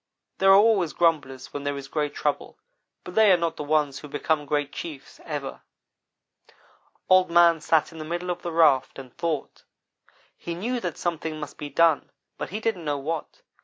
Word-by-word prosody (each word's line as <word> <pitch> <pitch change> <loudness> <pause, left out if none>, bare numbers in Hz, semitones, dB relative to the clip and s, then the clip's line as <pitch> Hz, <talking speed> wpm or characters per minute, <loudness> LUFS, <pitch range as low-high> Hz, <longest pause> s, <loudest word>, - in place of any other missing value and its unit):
There 195 - +4
are 195 - +9
always 200 -6 +3
grumblers 145 -6 0
when 145 - -5
there 145 0 -2
is 140 -1 -7
great 150 0 -2
trouble, 145 -1 -2 0.5
but 180 - -9
they 215 -1 +6
are 180 - +6
not 170 -1 -1
the - - -5
ones 150 -2 +1
who 150 - -10
become 145 +1 -1
great 145 0 -1
chiefs 150 -5 -8
ever. - - -5 1.5
"Old 185 -1 +5
man 170 -1 +5
sat 160 +1 +2
in 165 - -11
the - - -5
middle 175 +3 -3
of 175 - -5
the 175 - -4
raft 155 -5 +3
and 130 -3 -11
thought. 160 -4 -3 0.7
He 170 - -6
knew 240 +8 -2
that 180 -7 -4
something 160 -2 -3
must 150 - -8
be 145 - -5
done, 160 +1 +3 0.3
but - - -4
he 210 - -4
didn't 220 -6 -2
know 145 -2 -1
what. 155 +3 -5
160 Hz, 190 wpm, -25 LUFS, 145-175 Hz, 1.5 s, are